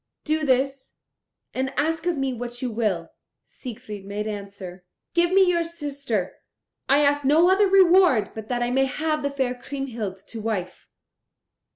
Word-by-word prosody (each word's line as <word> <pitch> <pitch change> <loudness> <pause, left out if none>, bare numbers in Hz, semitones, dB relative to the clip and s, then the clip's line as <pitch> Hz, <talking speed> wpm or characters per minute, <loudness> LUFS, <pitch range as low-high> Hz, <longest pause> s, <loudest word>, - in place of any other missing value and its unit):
Do 310 0 0
this, 270 0 0 0.6
and 265 +1 -1
ask 325 +3 0
of 345 -3 +1
me 270 -1 -1
what 245 0 -6
you 250 -2 -2
will." 205 -7 -1 0.3
Siegfried 220 -5 -9
made 205 +2 -4
answer, 200 -3 -7 0.3
"Give 345 0 +3
me 385 +1 +6
your 340 -1 +2
sister: 280 - -3 0.5
I 280 +2 +5
ask 290 0 +2
no 320 +6 +5
other 400 +2 +4
reward 365 - +5
but 220 -1 -8
that 240 0 -1
I 240 - -1
may 270 +1 +3
have 305 +3 -1
the 285 - -1
fair 265 -3 -1
Kriemhild 245 -6 -5
to 225 - -6
wife." 200 -5 -4
265 Hz, 160 wpm, -24 LUFS, 220-310 Hz, 0.6 s, me